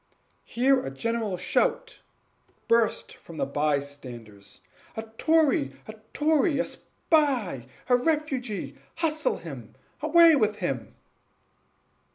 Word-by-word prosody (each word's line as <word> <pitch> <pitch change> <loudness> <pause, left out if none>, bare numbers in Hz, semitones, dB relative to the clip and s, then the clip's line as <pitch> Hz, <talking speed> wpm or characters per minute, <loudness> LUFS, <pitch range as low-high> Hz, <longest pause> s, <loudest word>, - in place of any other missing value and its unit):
Here 260 +2 +2
a - - -4
general 215 +7 -2
shout - - -1 0.7
burst 230 -1 +1
from 165 - -13
the - - 0
bystanders 140 -9 -4 0.4
"A 220 - -3 0.2
tory! 315 -2 +3
a 215 - -7 0.2
tory! 305 0 +2
a 260 - +1
spy! 250 - -1 0.2
a 250 - +5
refugee! 265 -6 -2 0.2
hustle 310 -2 0
him! 135 -10 -10 0.3
away 330 +1 +6
with 215 -6 +1
him!" 140 - -4
230 Hz, 105 wpm, -26 LUFS, -, 0.7 s, away